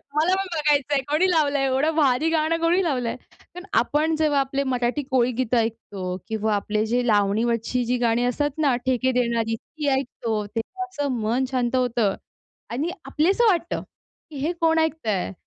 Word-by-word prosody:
मला 330 +5 +3
पण 390 - -1
बघायचं 295 -2 +2
आहे 275 - +2
कोणी 345 +5 +3
लावलं 290 -4 +2
आहे 270 - +1
एवढं 290 +5 +1
भारी 290 +1 +3
गाणं 325 +1 +1
कोणी 350 +3 +3
लावलं 250 -8 -1
आहे. - - -4 0.2
कारण 360 +1 -12
आपण 315 +2 +1
जेव्हा 305 -2 +2
आपले 275 +1 -1
मराठी 250 +2 -1
कोळीगीतं 250 -1 +1
ऐकतो 205 -5 -3
किंवा 220 -1 0
आपले 210 +2 -1
जे 245 +2 0
लावणीवरची 225 +4 +1
जी 250 +1 0
गाणी 230 +1 +2
असतात 290 +4 -1
ना 285 -5 +2
ठेके 260 0 +1
देणारी 235 -2 0
ती 300 +5 -7
ऐकतो. 225 -5 -3
तेव्हा 230 - -5
असं 290 -7 -2
मन 240 +5 +1
शांत 250 -1 0
होतं 240 -5 +1 0.6
आणि 285 +8 -2
आपलंसं 360 +12 +2
वाटतं, 345 -3 0 0.5
की 295 - -9
हे 300 +6 -1
कोण 325 0 +3
ऐकतं 320 -8 0
आहे 195 -1 -1
260 Hz, 175 wpm, -24 LUFS, 230-310 Hz, 0.6 s, मला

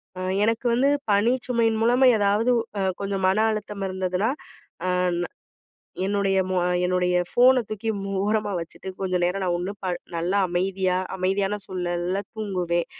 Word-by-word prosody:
ஆ, 185 - -7 0.2
எனக்கு 230 +2 0
வந்து 265 +4 +3 0.2
பணி 205 +4 +4 0.2
சுமையின் 230 -3 +1
மூலமா, 245 +3 +4
ஏதாவது 205 +4 +2 0.3
அ - - 0 0.2
கொஞ்சம் 195 -1 -2
மன 190 +2 +2
அழுத்தம் 210 -2 -4
இருந்ததுனா, 185 +2 -1 0.6
அ - - 0 0.3
ந - - -1 0.8
என்னுடைய 195 -1 +1
மோ 185 - -1 0.3
என்னுடைய 180 0 +1
ஃபோனை 255 +1 +5
தூக்கி 215 +1 -4
மூ 195 - -4 0.2
ஓரமா 210 -1 0
வச்சுட்டு, 170 +3 -8
கொஞ்சம் 185 -2 0
நேரம் 190 +2 -1
நான் 175 - +1
ஒன்னும் 190 +3 -5
ப - - -1 0.3
நல்லா 175 +4 0
அமைதியா 185 +1 0 0.2
அமைதியான 195 +2 0
சுழல்ல 180 +1 -2
தூங்குவேன். 180 -5 -1
195 Hz, 150 wpm, -24 LUFS, 185-215 Hz, 0.8 s, ஃபோனை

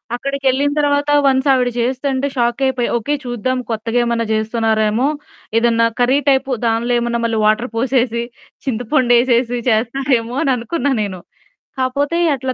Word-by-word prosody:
అక్కడికెళ్ళిన 275 +2 0
తర్వాత 290 0 +1 0.2
వన్స్ 265 0 +2
ఆవిడ 250 -2 +2
చేస్తుంటే 265 +2 -1
షాక్ 240 +2 0
అయిపోయ. 260 -2 0
ఓకే. 280 +6 -2
చూద్దాం 245 +1 -2
కొత్తగా 225 +2 -1
ఏమన్నా 235 -1 -1
చేస్తున్నారేమో 220 +1 0 0.5
ఏదన్నా 230 0 +3
కర్రీ 255 +3 +3
టైపు 270 0 +1
దానిలో 230 +2 0
ఏమన్న 235 0 -1
మళ్ళీ 230 -1 0
వాటర్ 215 +4 +2
పోసేసి 240 -2 0 0.4
చింతపండు 245 0 +1
ఏసేసి 240 0 +1
చేస్తారేమో 240 +1 0
అని 275 - +1
అనుకున్నా 280 +5 -2
నేను. 195 -3 -4 0.6
కాపోతే 280 +5 0 0.2
అట్లా 260 0 -3
245 Hz, 135 wpm, -17 LUFS, 230-265 Hz, 0.6 s, ఏదన్నా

